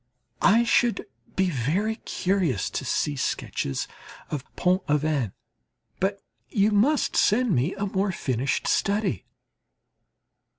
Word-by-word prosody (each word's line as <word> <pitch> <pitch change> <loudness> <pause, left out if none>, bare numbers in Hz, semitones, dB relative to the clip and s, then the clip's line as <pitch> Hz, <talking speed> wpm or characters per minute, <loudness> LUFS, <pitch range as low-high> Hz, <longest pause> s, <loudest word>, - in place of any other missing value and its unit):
I 225 +4 +5
should 235 0 +2 0.3
be 190 -1 +2
very 175 - 0
curious 180 - -1
to - - -3
see 150 - 0
sketches 70 - -2 0.4
of 145 -4 -3
Pont 180 +1 +2
Aven; 150 -7 +1 0.7
but 195 +1 -1 0.3
you 210 0 +2
must 250 +9 +2
send 230 0 +3
me 140 +6 +1
a 200 - -2
more 195 0 0
finished 130 -5 -1
study. 200 - 0
190 Hz, 115 wpm, -26 LUFS, 145-205 Hz, 0.7 s, I